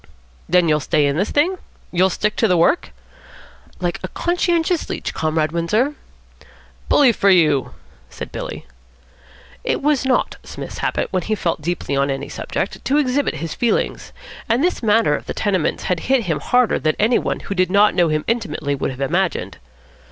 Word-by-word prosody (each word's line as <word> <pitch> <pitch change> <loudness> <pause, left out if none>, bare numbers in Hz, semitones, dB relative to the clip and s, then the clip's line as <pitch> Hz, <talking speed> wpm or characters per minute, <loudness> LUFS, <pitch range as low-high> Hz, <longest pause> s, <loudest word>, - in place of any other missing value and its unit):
"Then 180 -1 +4
you'll 150 -1 +3
stay 150 +1 +1
in 140 0 +1
this 195 +6 0
thing? 355 +6 +1 0.3
You'll 185 +1 +3
stick 210 +3 -1
to 225 - +3
the 180 -3 +3
work?" 175 - +2 0.9
"Like 175 -1 -2
a 185 - -4
conscientious 345 - 0
leech, - - -4
Comrade 155 -1 0
Windsor." 210 - +1 1.0
"Bully 280 -4 +6
for 200 -3 +2
you," 155 -8 +3 0.3
said - - -8
Billy. - - -6 1.0
It - - 0
was 295 -2 +2
not 265 -1 0
Psmith's - - -8
habit, - - -1
when 185 - +1
he 215 +5 -1
felt 170 -5 -2
deeply 170 -3 -2
on 140 +1 +1
any 135 0 -3
subject, - - -4
to 280 - +1
exhibit 285 -1 +1
his 165 -1 -4
feelings; 240 - -1 0.4
and 235 +5 +2
this 360 - 0
matter 220 -8 +3
of - - -7
the - - -4
tenements 190 -6 0
had 180 -2 0
hit 265 +3 +1
him 160 -7 -1
harder 250 - +2
than 155 0 +1
any 225 +4 +3
one - - -3
who - - -4
did 185 -2 +1
not 200 +2 +4
know 175 -2 +3
him 155 -1 0
intimately 160 -11 -1
would 140 - -2
have 130 0 -7
imagined. 175 +7 -1
185 Hz, 180 wpm, -20 LUFS, 155-245 Hz, 1.0 s, Bully